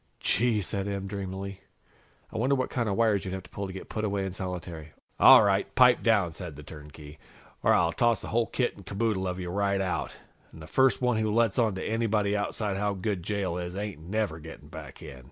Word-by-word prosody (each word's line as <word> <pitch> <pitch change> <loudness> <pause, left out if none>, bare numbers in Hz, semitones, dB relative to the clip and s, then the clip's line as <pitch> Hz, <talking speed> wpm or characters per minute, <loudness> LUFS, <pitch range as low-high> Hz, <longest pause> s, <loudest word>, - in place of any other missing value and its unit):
"Gee!" 120 +3 +2
Em 105 - +1
said 100 +1 -3
dreamily. 100 0 -5 0.7
"I - - -4
wonder 130 +4 +2
what 130 -1 -2
kind 120 -4 -1
of 100 - 0
wires 110 -3 +2
you'd 95 -1 -4
have 95 - -6
to - - -17
pull 100 0 -4
to - - -7
get 95 - -8
put 110 - -4
away 100 -2 -1
in 95 - -4
solitary?" 85 -4 -6 0.3
"All - - +9
right, 100 -1 +1
pipe 125 -1 +6
down," 100 -7 +2
said 85 -3 -8
the 75 - -10
turnkey, 75 0 -12 0.4
"or - - +3
I'll 85 -1 +3
toss 120 -2 +2
the - - -8
whole 115 +1 +1
kit 125 - -1
and 100 - -13
caboodle 100 -1 -1
of 90 0 -3
you 90 -1 -4
right 100 0 +1
out. 95 -2 -2 0.4
And 80 -1 -11
first 130 +6 +3
one 125 -2 +2
who 110 -1 0
lets 115 0 +2
on 110 -4 +2
to 95 - -4
anybody 110 -2 +1
outside 100 -1 -2
how 100 0 0
good 95 -1 -2
jail 95 -2 -2
is 90 +1 -5
ain't 100 -4 -4
never 95 -1 -2
getting 75 -2 -11
back 75 -3 -10
in!" 65 - -9
100 Hz, 225 wpm, -28 LUFS, 90-110 Hz, 0.7 s, All